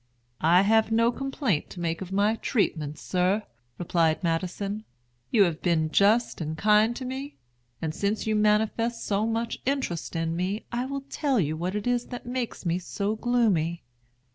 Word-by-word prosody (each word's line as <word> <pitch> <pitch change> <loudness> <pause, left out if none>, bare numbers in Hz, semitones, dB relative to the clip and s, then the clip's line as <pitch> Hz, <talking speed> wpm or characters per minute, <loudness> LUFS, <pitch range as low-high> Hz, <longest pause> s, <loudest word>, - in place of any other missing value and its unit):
"I 175 +4 +5
have 220 +1 +3
no 230 +1 +4
complaint 270 - -1
to 180 - -9
make 165 0 -2
of 190 -1 -6
my 205 +3 +2
treatment, 155 - -1
sir," 185 +4 0 0.3
replied 165 -1 +1
Madison. 185 +5 -2 0.5
"You 210 - +5
have 170 -4 -1
been 160 -3 +1
just 215 +2 +3
and 160 0 -3
kind 215 +5 +4
to 255 - -5
me; 270 +3 -5 0.5
and 155 -1 -1
since 200 +4 -1
you 220 -1 +1
manifest 220 +2 +1
so 205 +2 +1
much 230 +1 -2
interest 260 - -2
in 165 0 -1
me, 190 +5 -2
I 245 +1 -1
will 275 0 -3
tell 275 -2 0
you 155 -3 0
what 180 +4 -3
it 210 - -2
is 245 -1 0
that 245 -1 -7
makes 245 -4 -4
me 170 +1 +1
so 200 +3 -2
gloomy." 215 -9 +1
205 Hz, 170 wpm, -27 LUFS, 170-235 Hz, 0.5 s, I